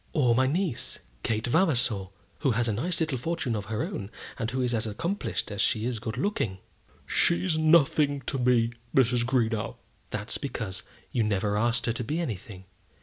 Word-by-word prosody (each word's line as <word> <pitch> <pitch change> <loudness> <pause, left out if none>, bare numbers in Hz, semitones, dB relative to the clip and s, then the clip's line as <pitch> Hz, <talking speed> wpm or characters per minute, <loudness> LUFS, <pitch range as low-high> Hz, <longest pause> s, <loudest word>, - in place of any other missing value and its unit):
"Or 130 -7 +4
my 130 +2 +3
niece, 165 -2 0 0.2
Kate 110 - -1
Vavasor, 125 - +2 0.3
who 140 - +2
has 120 +2 +1
a 110 - +1
nice 165 - 0
little 155 -6 0
fortune 145 -4 -1
of 105 -1 -3
her 110 +2 -2
own, 100 -2 -4 0.3
and 115 -2 -1
who 130 +2 -1
is 125 -1 0
as 115 0 +1
accomplished 165 - -2
as 100 - -1
she 110 -2 +1
is 120 -3 -1
good 110 +2 -4
looking." 125 - -1 0.5
"She's 90 - +2
nothing 150 -3 +4
to 135 +1 -2
me, 120 -2 +3 0.2
Mrs. 125 -2 +4
Greenow." 120 -3 0 0.3
"That's - - -4
because 95 0 -4 0.3
you 120 - +1
never 105 -1 +1
asked 115 +2 +1
her 115 - +2
to 120 - -3
be 150 +9 -2
anything. 100 - -5
120 Hz, 180 wpm, -28 LUFS, 110-140 Hz, 0.5 s, Or